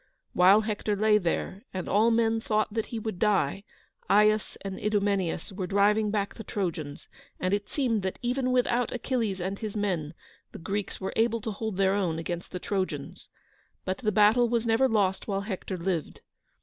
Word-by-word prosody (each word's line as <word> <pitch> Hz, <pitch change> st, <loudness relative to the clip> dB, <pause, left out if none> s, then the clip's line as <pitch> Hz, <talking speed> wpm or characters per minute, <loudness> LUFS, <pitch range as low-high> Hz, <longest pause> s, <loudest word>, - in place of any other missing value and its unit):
While 190 Hz, +4 st, +6 dB
Hector 210 Hz, -1 st, -2 dB
lay 210 Hz, +1 st, +4 dB
there, 185 Hz, +2 st, -2 dB
and 185 Hz, -, -3 dB
all 215 Hz, +3 st, +4 dB
men 225 Hz, -1 st, +2 dB
thought 215 Hz, -1 st, 0 dB
that 225 Hz, -1 st, -1 dB
he 230 Hz, -, -5 dB
would 220 Hz, -4 st, -4 dB
die, 195 Hz, -4 st, +1 dB, 0.5 s
Aias 210 Hz, +1 st, +3 dB
and 195 Hz, -1 st, -5 dB
Idomeneus 200 Hz, -4 st, 0 dB
were 190 Hz, -1 st, -4 dB
driving 210 Hz, +2 st, +3 dB
back 205 Hz, -1 st, -1 dB
the 225 Hz, -, -9 dB
Trojans, 165 Hz, -9 st, -4 dB, 0.3 s
and 185 Hz, +1 st, 0 dB
it 205 Hz, 0 st, -1 dB
seemed 240 Hz, -7 st, 0 dB
that, 190 Hz, 0 st, -3 dB
even 255 Hz, +1 st, 0 dB
without 245 Hz, -1 st, +1 dB
Achilles 230 Hz, -5 st, -1 dB
and 190 Hz, +3 st, -3 dB
his 215 Hz, -2 st, -5 dB
men, 175 Hz, -7 st, -2 dB, 0.4 s
the -, -, -7 dB
Greeks 195 Hz, +4 st, -4 dB
were 190 Hz, -, -4 dB
able 230 Hz, +1 st, +2 dB
to 220 Hz, -, -3 dB
hold 215 Hz, -1 st, -4 dB
their 195 Hz, 0 st, +3 dB
own 180 Hz, -5 st, 0 dB
against 175 Hz, +1 st, -4 dB
the 180 Hz, -, -4 dB
Trojans. 190 Hz, -1 st, -4 dB, 0.6 s
But 185 Hz, 0 st, -2 dB
the 215 Hz, -4 st, 0 dB
battle 215 Hz, +4 st, +4 dB
was 235 Hz, -1 st, 0 dB
never 230 Hz, +4 st, +3 dB
lost 195 Hz, -4 st, +1 dB
while 195 Hz, -2 st, -1 dB
Hector 195 Hz, -2 st, -4 dB
lived. 170 Hz, -2 st, -3 dB
205 Hz, 180 wpm, -28 LUFS, 190-220 Hz, 0.6 s, While